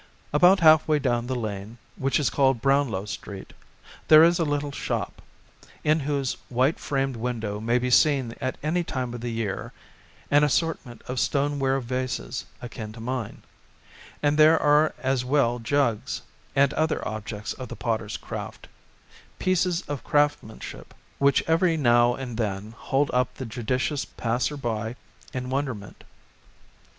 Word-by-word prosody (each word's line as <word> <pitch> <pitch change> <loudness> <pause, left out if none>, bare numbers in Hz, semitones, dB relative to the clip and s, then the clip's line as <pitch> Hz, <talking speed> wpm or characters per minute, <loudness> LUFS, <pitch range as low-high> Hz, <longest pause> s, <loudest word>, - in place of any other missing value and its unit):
About 180 +5 +6
half 155 -1 +6
way 155 -1 +3
down 120 -4 0
the 130 - -2
lane, 110 -1 -5 0.2
which 135 +2 +1
is 145 - +1
called 135 -3 +3
Brownlow 135 -6 +1
Street, 100 -1 -8 0.5
there 155 0 +9
is 170 +1 +4
a - - +3
little 145 -1 -1
shop, 140 - -3 0.6
in 155 +1 +3
whose 140 -2 -1
white 130 +5 +1
framed 135 -2 -1
window 115 -3 -3
may 115 +3 +1
be 125 0 -1
seen 135 -4 +4
at 130 -1 -2
any 170 +4 +1
time 130 -6 -3
of 120 - -6
the 120 - -3
year 115 -4 -3 0.6
an 145 +1 +5
assortment 150 -4 -1
of 125 0 -4
stoneware 140 -1 +1
vases 130 0 -3 0.2
akin 110 -3 -7
to 115 - -11
mine; 120 -1 -4 0.8
and 145 +1 +2
there 155 +1 +7
are 150 +1 +3
as 130 -1 0
well 125 -2 +2
jugs, 120 -2 0 0.3
and 140 0 +4
other 160 0 0
objects 110 0 -5
of 130 - -8
the - - -7
potter's 110 -3 -2
craft; - - -7 0.7
pieces 180 -1 +1
of 145 -5 -5
craftsmanship 145 -7 -1 0.2
which 140 -1 +4
every 165 +1 +2
now 120 -3 +4
and 125 -4 -6
then 105 -1 -3
hold 140 +4 0
up 125 0 +1
the 130 - -6
judicious 125 +5 -1
passer 125 +5 -2
by 115 -3 -3 0.4
in 125 0 -4
wonderment. 130 -8 -4
130 Hz, 150 wpm, -25 LUFS, 115-145 Hz, 0.8 s, there